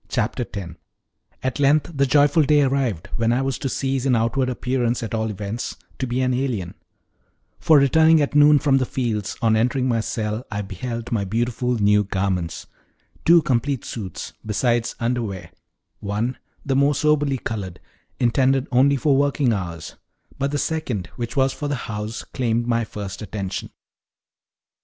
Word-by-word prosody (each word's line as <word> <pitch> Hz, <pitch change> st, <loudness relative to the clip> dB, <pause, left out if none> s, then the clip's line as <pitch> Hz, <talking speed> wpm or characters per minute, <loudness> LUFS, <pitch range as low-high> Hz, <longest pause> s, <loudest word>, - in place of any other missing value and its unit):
Chapter 125 Hz, 0 st, -1 dB
10 95 Hz, -7 st, -7 dB, 0.7 s
At 130 Hz, 0 st, -2 dB
length 145 Hz, +3 st, +3 dB
the 140 Hz, -1 st, +2 dB
joyful 145 Hz, +3 st, +4 dB
day 150 Hz, 0 st, +4 dB
arrived 130 Hz, -10 st, -1 dB
when 115 Hz, 0 st, +2 dB
I 125 Hz, +3 st, +1 dB
was 135 Hz, -1 st, -2 dB
to 135 Hz, -, -2 dB
cease, 135 Hz, 0 st, -1 dB
in 135 Hz, -2 st, +3 dB
outward 115 Hz, +3 st, +1 dB
appearance 125 Hz, -1 st, -1 dB
at 115 Hz, -, -5 dB
all 110 Hz, 0 st, -1 dB
events, 105 Hz, +3 st, -4 dB, 0.2 s
to 130 Hz, -, -1 dB
be 125 Hz, +2 st, -1 dB
an 130 Hz, 0 st, +1 dB
alien; 125 Hz, -9 st, -2 dB, 0.9 s
for 155 Hz, -, +5 dB
returning 160 Hz, +4 st, +5 dB
at 145 Hz, -1 st, 0 dB
noon 150 Hz, 0 st, +7 dB
from 135 Hz, -2 st, +3 dB
the 130 Hz, -, -1 dB
fields, 110 Hz, -6 st, -2 dB
on 110 Hz, -1 st, +4 dB
entering 125 Hz, +3 st, +1 dB
my 115 Hz, -2 st, +1 dB
cell 110 Hz, 0 st, -3 dB
I 105 Hz, -1 st, -3 dB
beheld 115 Hz, +5 st, -5 dB
my 110 Hz, -4 st, +1 dB
beautiful 120 Hz, +4 st, -1 dB
new 105 Hz, 0 st, +4 dB
garments 95 Hz, -4 st, -2 dB, 0.6 s
two 170 Hz, -1 st, +6 dB
complete 130 Hz, +1 st, 0 dB
suits, 100 Hz, -6 st, -6 dB
besides 120 Hz, +2 st, 0 dB
underwear: 115 Hz, -6 st, -2 dB, 0.5 s
one, 105 Hz, +5 st, -2 dB, 0.3 s
the 135 Hz, -, 0 dB
most 140 Hz, +1 st, +2 dB
soberly 150 Hz, -3 st, +2 dB
colored, 100 Hz, -7 st, -5 dB, 0.4 s
intended 130 Hz, +2 st, +2 dB
only 135 Hz, +3 st, +4 dB
for 140 Hz, +1 st, +2 dB
working 140 Hz, -3 st, +2 dB
hours; 85 Hz, -5 st, -5 dB, 0.4 s
but 140 Hz, +1 st, 0 dB
the 145 Hz, -, -1 dB
second, 140 Hz, -, -2 dB
which 120 Hz, +3 st, -5 dB
was 135 Hz, 0 st, +3 dB
for 145 Hz, -, -4 dB
the 145 Hz, -, -1 dB
house, 105 Hz, +1 st, -5 dB
claimed 120 Hz, -2 st, -1 dB
my 115 Hz, -1 st, +1 dB
first 100 Hz, -1 st, -7 dB
attention. 100 Hz, -2 st, -5 dB
120 Hz, 160 wpm, -22 LUFS, 110-135 Hz, 0.9 s, noon